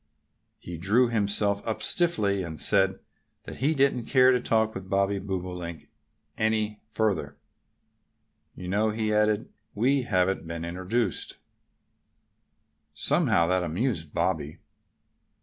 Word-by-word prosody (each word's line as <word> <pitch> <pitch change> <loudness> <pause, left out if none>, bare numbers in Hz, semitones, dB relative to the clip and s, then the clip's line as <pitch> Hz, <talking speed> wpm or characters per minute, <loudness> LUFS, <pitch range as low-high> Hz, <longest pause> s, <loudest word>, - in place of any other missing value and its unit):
He 85 -2 -8
drew 110 +8 +3
himself 100 -2 +1
up 110 - -2
stiffly 105 - +2
and 80 -3 -6
said 95 -2 +2 0.5
that - - -9
he 150 +5 +1
didn't 135 -4 +2
care 130 -1 +5
to 125 - +2
talk 110 -2 +1
with 95 0 -8
Bobby 100 +1 +1
Bobolink 90 -3 -5 0.5
any 110 -1 0
further. 110 -5 -1 1.2
"You 90 - -8
know," 105 +4 +1
he 110 0 -1
added, 105 0 +1 0.3
"we 130 +6 +2
haven't 95 -6 0
been 85 0 -5
introduced." 95 +5 -2 1.6
Somehow 85 - +3
that 90 0 +2
amused 85 - -2
Bobby. 75 +2 -1
100 Hz, 115 wpm, -27 LUFS, 90-110 Hz, 1.6 s, care